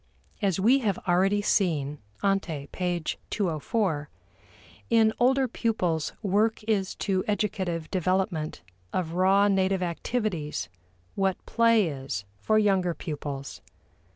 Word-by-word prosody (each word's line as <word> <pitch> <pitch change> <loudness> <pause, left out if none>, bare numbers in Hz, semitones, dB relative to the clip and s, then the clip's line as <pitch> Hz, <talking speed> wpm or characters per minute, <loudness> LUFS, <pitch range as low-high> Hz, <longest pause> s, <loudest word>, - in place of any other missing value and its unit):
As 195 -3 +1
we 240 +8 +5
have 205 -7 0
already 195 +3 +3
seen 150 -9 +1 0.2
(ante, 180 -8 0
p. 175 -2 -2 0.3
204), 170 - -1 0.8
in 225 -1 +4
older 260 +2 +4
pupils 185 -10 -1
work 215 +3 +1
is 210 -3 0
to 190 -2 0
educative 190 -6 -1
development 185 - -1 0.3
of 170 -3 -1
raw 190 +3 +4
native 190 -1 +2
activities 175 -3 -2 0.4
what 195 -1 -1
play 230 -4 +4
is 135 -9 -4
for 215 - +2
younger 190 -5 +2
pupils. 145 -3 -6
190 Hz, 110 wpm, -27 LUFS, 165-210 Hz, 0.8 s, we